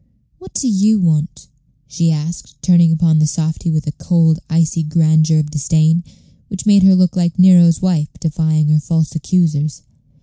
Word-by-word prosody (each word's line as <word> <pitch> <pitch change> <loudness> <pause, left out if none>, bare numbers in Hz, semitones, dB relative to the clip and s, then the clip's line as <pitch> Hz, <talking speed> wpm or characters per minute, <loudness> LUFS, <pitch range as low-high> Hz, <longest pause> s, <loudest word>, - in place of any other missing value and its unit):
"What 370 - -16
do 270 - -2
you 215 0 +1
want?" 160 -3 -2 0.4
she 165 +4 -1
asked, 155 -2 -6
turning 170 -2 +3
upon 160 -1 +1
the 155 - +2
softy 160 +2 -3
with 155 -1 -2
a 150 - -3
cold, 165 0 0
icy 165 0 0
grandeur 155 0 +1
of 150 -1 -2
disdain, 160 +3 0 0.4
which 195 -1 -8
made 205 -2 +4
her 190 0 +5
look 185 -2 +1
like 175 -1 -1
Nero's 180 -2 +4
wife 165 -5 0
defying 155 -1 -1
her 155 0 +2
false 160 +1 -2
accusers. 155 -2 -2
160 Hz, 165 wpm, -16 LUFS, 155-175 Hz, 0.4 s, her